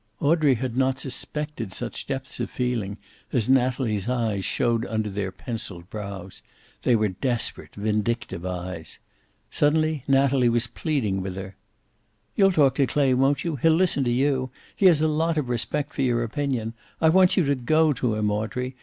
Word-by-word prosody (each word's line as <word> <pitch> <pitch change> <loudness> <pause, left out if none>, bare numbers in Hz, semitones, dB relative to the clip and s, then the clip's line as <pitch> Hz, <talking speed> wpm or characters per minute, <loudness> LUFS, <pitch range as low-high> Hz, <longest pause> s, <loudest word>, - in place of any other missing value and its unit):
Audrey 150 -2 +3
had 120 0 -3
not 130 0 +2
suspected 140 -3 -4
such 120 +5 -5
depths 135 -1 -5
of - - -2
feeling 115 -5 -2 0.3
as 115 -5 +1
Natalie's 125 -5 +1
eyes 110 -6 0
showed 115 +4 +1
under 110 -2 -2
their 95 -1 -3
penciled 100 -8 -7
brows. 100 -3 -7 0.4
They 125 - +3
were 105 -2 +2
desperate, 120 +5 -3
vindictive 105 -2 -2
eyes. 90 -2 -5 0.5
Suddenly 155 -1 +1
Natalie 135 -2 +3
was 120 0 +2
pleading 115 -9 -1
with 95 -1 -5
her. 95 0 -7 0.8
"You'll 195 -1 +5
talk 145 -7 +4
to 135 - +3
Clay, 140 -3 +2
won't 135 +2 +2
you? 165 -4 -2
He'll 160 +5 +4
listen 170 -5 +2
to 120 - +1
you. 130 +1 +1 0.3
He 195 - +5
has 165 -4 +5
a - - +4
lot 160 +1 0
of 140 -5 -1
respect 130 +5 -2
for - - -2
your 120 -3 +2
opinion. 120 -2 -2 0.3
I 160 - +4
want 185 +2 +5
you 180 - +4
to 140 - +2
go 155 +4 +2
to 120 -4 -1
him, 105 -1 0
Audrey. 125 +5 -3
125 Hz, 170 wpm, -25 LUFS, 110-145 Hz, 0.8 s, You'll